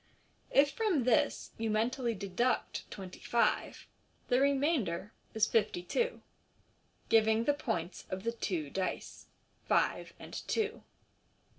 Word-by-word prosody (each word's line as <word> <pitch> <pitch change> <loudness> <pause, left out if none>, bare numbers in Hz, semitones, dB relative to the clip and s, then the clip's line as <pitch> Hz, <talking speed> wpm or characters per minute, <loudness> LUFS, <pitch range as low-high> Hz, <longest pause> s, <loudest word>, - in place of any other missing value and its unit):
If 285 +1 +5
from 400 - +1
this 235 -2 +2
you 225 0 0
mentally 235 +2 0
deduct 200 +6 -1
twenty 190 -2 -8
five 235 - 0 0.4
the 250 0 +4
remainder 270 - +1 0.2
is 220 -1 +4
fifty 215 -5 +1
two, 485 - -1 0.9
giving 220 0 +4
the 290 - +3
points 175 - -3
of 185 +1 -4
the 230 - 0
two 175 -10 -3
dice 190 -1 -4 0.2
— - - -36
five - - +1
and - - -11
two. 445 0 -1
230 Hz, 125 wpm, -32 LUFS, 195-275 Hz, 0.9 s, If